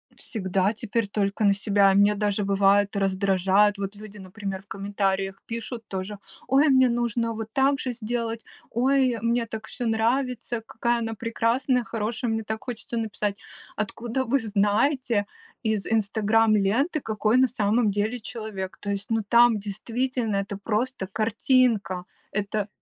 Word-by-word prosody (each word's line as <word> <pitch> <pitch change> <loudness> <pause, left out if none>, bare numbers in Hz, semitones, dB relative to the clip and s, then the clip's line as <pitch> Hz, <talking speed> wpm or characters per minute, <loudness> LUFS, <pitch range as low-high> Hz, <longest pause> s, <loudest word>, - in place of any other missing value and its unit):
Всегда 190 -1 -1
теперь 230 -1 -2
только 200 +1 -1
на 200 -1 +5
себя. 200 -1 +3
Меня 205 +1 +4
даже, 205 0 0
бывает, 200 +1 +3
раздражает. 195 +1 +2
Вот 200 +1 -4
люди, 210 0 -11
например, 195 0 -6
в 200 - -25
комментариях 195 -1 -2
пишут 230 +1 -5
тоже: 195 +2 -5 0.3
"Ой, 280 +3 +4
мне 260 -2 +5
нужно 235 -1 0
вот 220 0 -5
так 275 +1 +3
же 255 - -2
сделать. 230 -1 -3 0.3
Ой, 255 0 +2
мне 235 0 +1
так 220 0 -7
всё 245 - -5
нравится. 235 +1 0
Какая 235 +1 0
она 225 -1 -3
прекрасная, 235 +3 0
хорошая". 225 +1 -2
Мне 225 0 -1
так 220 0 -5
хочется 240 -1 -5
написать: 210 -2 -2 0.4
"Откуда 230 +4 -2
вы 265 +3 +1
знаете 215 +2 +1 0.4
из 220 -3 0
"Инстаграм" 220 +1 +2
ленты, 245 - +1
какой 220 +2 +1
на 260 - +5
самом 220 -2 +1
деле 210 +5 -1
человек?" 215 -4 -6
То 205 - -5
есть, 200 +1 -3
ну, 225 -1 +2
там 235 -1 +5
действительно 225 +2 -2
это 200 0 -3
просто 215 0 -2
картинка. 215 -4 +1 0.3
Это 205 0 -2
220 Hz, 145 wpm, -25 LUFS, 200-235 Hz, 0.4 s, на